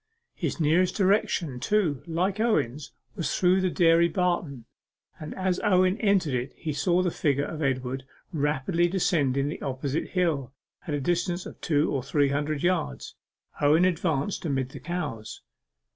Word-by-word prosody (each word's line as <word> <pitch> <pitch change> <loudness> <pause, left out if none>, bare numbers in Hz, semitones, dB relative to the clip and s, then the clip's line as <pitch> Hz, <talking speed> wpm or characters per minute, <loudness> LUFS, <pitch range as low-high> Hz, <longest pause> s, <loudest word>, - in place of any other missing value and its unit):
His - - -3
nearest 165 +4 +2
direction, 185 - +1
too, 175 -6 +1
like 185 +5 -1
Owen's, 150 - 0 0.2
was 170 -6 -2
through 185 +1 +3
the 185 - +1
dairy 170 -1 +4
barton, 170 - -1 0.5
and 155 - -7
as 185 -1 0
Owen 185 -2 +3
entered 195 - +2
it 125 +1 -2
he 155 - -4
saw 175 +5 +2
the 180 - 0
figure 140 -2 0
of 160 - -6
Edward 130 -1 -1 0.3
rapidly 150 +3 +1
descending 145 -7 +1
the 150 - -5
opposite 135 +2 -2
hill, 160 -9 -1 0.3
at 150 - -1
a - - -1
distance 175 +4 -1
of - - -10
two 150 -1 +1
or 135 - -1
three 140 +2 +1
hundred 145 +1 -1
yards. 175 - -1 0.5
Owen 155 +5 +5
advanced 165 -1 0
amid 135 -5 -1
the - - -9
cows. 150 -12 -5
160 Hz, 155 wpm, -26 LUFS, 140-180 Hz, 0.5 s, Owen